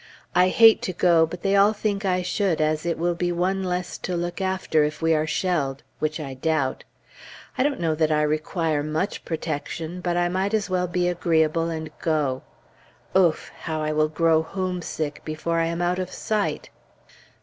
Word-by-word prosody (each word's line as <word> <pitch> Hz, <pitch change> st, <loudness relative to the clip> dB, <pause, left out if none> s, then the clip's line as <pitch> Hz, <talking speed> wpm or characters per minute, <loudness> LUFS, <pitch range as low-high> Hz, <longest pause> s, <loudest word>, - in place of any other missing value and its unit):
I 180 Hz, +1 st, +5 dB
hate 225 Hz, +3 st, +6 dB
to 185 Hz, -, -3 dB
go, 170 Hz, -2 st, +4 dB
but 175 Hz, +2 st, -8 dB
they 195 Hz, 0 st, +2 dB
all 200 Hz, +2 st, +5 dB
think 205 Hz, -1 st, -2 dB
I 185 Hz, -1 st, +1 dB
should, 185 Hz, -2 st, 0 dB
as 155 Hz, +1 st, 0 dB
it 170 Hz, -, 0 dB
will 175 Hz, +1 st, +1 dB
be 175 Hz, +1 st, -1 dB
one 185 Hz, +3 st, 0 dB
less 180 Hz, -1 st, -3 dB
to 180 Hz, -, -3 dB
look 175 Hz, +2 st, -3 dB
after 190 Hz, -5 st, +1 dB
if 150 Hz, +1 st, -2 dB
we 165 Hz, 0 st, +2 dB
are 155 Hz, 0 st, +1 dB
shelled 155 Hz, -7 st, -1 dB, 0.2 s
which 155 Hz, +1 st, -1 dB
I 140 Hz, -3 st, -5 dB
doubt. 140 Hz, -1 st, -1 dB, 0.7 s
I -, -, 0 dB
don't 280 Hz, 0 st, +1 dB
know 165 Hz, -2 st, +1 dB
that 155 Hz, 0 st, +1 dB
I 150 Hz, 0 st, +3 dB
require 155 Hz, 0 st, 0 dB
much 155 Hz, +7 st, -2 dB
protection, 160 Hz, +2 st, -4 dB
but 175 Hz, -1 st, 0 dB
I 175 Hz, 0 st, +2 dB
might 190 Hz, +4 st, 0 dB
as 205 Hz, -3 st, -2 dB
well 180 Hz, -1 st, +1 dB
be 175 Hz, 0 st, 0 dB
agreeable 165 Hz, -2 st, +1 dB
and 160 Hz, -1 st, -5 dB
go. 150 Hz, -5 st, 0 dB, 0.7 s
Ouf! 175 Hz, -4 st, +3 dB
how 155 Hz, -1 st, -4 dB
I 155 Hz, -, 0 dB
will 155 Hz, 0 st, +2 dB
grow 160 Hz, 0 st, +3 dB
homesick, 175 Hz, -4 st, -4 dB
before 160 Hz, +2 st, -2 dB
I 165 Hz, -, +1 dB
am 170 Hz, +1 st, -2 dB
out 180 Hz, +1 st, 0 dB
of 185 Hz, -1 st, -4 dB
sight! 215 Hz, -2 st, -2 dB
170 Hz, 190 wpm, -24 LUFS, 155-185 Hz, 0.7 s, hate